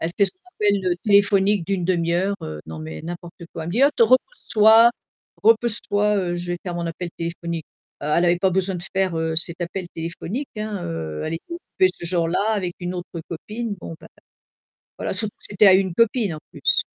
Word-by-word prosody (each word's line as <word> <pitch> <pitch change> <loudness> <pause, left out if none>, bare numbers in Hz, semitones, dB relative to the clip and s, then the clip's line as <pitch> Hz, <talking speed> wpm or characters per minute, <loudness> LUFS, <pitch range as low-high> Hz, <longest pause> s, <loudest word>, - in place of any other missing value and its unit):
elle 165 - -1
fait 200 - +5
son 370 - -4
appel, 205 - +1
heu, 175 - +2
téléphonique 200 -2 +3
d'1/2 175 -3 0
heure, 195 +3 +1
heu, 75 -1 -6
non 80 0 -7
mais 80 0 -7
n'importe 175 0 -7 0.2
quoi, 160 - -5
elle - - -5
me - - -3
dit: 255 - +3
«Heu, 285 - +6
te - - +4
repose-toi, 230 - +5 0.5
repose-toi, 210 -4 +2
je 175 0 -3
vais 175 - -3
faire 180 -2 -5
mon 170 0 -3
appel 170 +1 -5
téléphonique». 170 -1 -4 0.4
Heu, - - -3
elle 170 +4 +2
avait 175 0 +3
pas 190 - +3
besoin 190 0 +1
de 175 - -6
faire, 185 -3 +1
heu, 160 0 -1
cet 170 +1 0
appel 175 +1 -4
téléphonique, 170 - -5
hein, 210 -2 -4
heu, 80 -2 -4
elle 160 - -2
était 340 - -8
occupée 190 - +1
ce - - -9
jour-là 170 0 +1
avec 185 -4 -2
une 175 +1 -4
autre 175 -2 -6
copine, 210 +6 -5
bon 165 - -7
ben, 160 - -13 0.9
voilà, - - -3
surtout 215 -2 0
que - - -11
c'était 205 0 +5
à 190 - +8
une 190 -2 +1
copine 225 -3 +2
en 155 - -7
plus. - - +2
180 Hz, 210 wpm, -22 LUFS, 170-205 Hz, 0.9 s, à